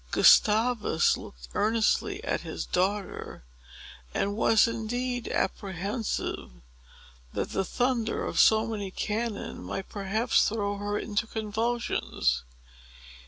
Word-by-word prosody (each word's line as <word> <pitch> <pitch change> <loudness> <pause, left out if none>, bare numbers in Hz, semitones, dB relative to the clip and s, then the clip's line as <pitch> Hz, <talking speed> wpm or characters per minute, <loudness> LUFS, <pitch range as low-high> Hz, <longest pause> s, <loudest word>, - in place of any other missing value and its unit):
Gustavus 215 -5 +4
looked - - -11
earnestly 230 - +1
at - - -1
his - - -5
daughter, 195 - -2 0.7
and 200 +1 0
was 220 0 +4
indeed 245 +2 -2
apprehensive 200 +4 -2 0.8
that - - -2
the 195 - 0
thunder 240 +2 0
of - - -2
so 220 0 +6
many 210 -4 -4
cannon 215 +2 -3
might 195 - -5
perhaps 215 +4 +1
throw 205 -2 -2
her 205 +1 -2
into 215 +1 -2
convulsions. 220 - -1
215 Hz, 105 wpm, -28 LUFS, 200-230 Hz, 0.8 s, so